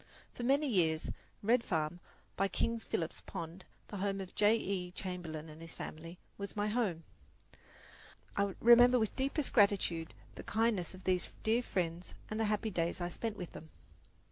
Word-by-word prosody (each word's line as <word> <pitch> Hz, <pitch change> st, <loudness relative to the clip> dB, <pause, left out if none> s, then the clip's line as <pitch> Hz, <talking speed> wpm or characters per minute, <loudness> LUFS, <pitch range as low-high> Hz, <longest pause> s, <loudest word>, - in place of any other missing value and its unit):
For -, -, -7 dB
many 275 Hz, +5 st, +3 dB
years 165 Hz, -, +2 dB, 0.3 s
Red 230 Hz, +3 st, +4 dB
Farm, 160 Hz, -3 st, -1 dB, 0.4 s
by 195 Hz, -, +2 dB
King 230 Hz, +3 st, 0 dB
Philip's 165 Hz, -6 st, -3 dB
Pond, 170 Hz, +3 st, -7 dB, 0.2 s
the 205 Hz, -, -5 dB
home 195 Hz, 0 st, -1 dB
of 190 Hz, -2 st, -5 dB
Mr. -, -, -34 dB
J. 210 Hz, +2 st, +5 dB
E. 190 Hz, -5 st, -2 dB
Chamberlin 170 Hz, -4 st, -5 dB
and 155 Hz, +1 st, -11 dB
his 165 Hz, 0 st, -9 dB
family, 165 Hz, +3 st, -7 dB, 0.2 s
was 200 Hz, +2 st, -5 dB
my 205 Hz, 0 st, 0 dB
home. 210 Hz, -8 st, 0 dB, 1.3 s
I 200 Hz, -1 st, +1 dB
remember 240 Hz, +2 st, +8 dB
with 220 Hz, -3 st, 0 dB
deepest 275 Hz, +2 st, -1 dB
gratitude 195 Hz, -6 st, +3 dB, 0.2 s
the -, -, -8 dB
kindness 215 Hz, -5 st, +1 dB
of 185 Hz, -, -13 dB
these 180 Hz, -2 st, +1 dB
dear 225 Hz, +2 st, +3 dB
friends 175 Hz, -5 st, -2 dB, 0.2 s
and 215 Hz, -, -2 dB
the 225 Hz, -, +2 dB
happy 210 Hz, +1 st, 0 dB
days 170 Hz, -1 st, 0 dB
I 175 Hz, 0 st, -1 dB
spent 220 Hz, +3 st, -3 dB
with 180 Hz, -3 st, -6 dB
them. 160 Hz, -, -10 dB
195 Hz, 170 wpm, -34 LUFS, 170-225 Hz, 1.3 s, remember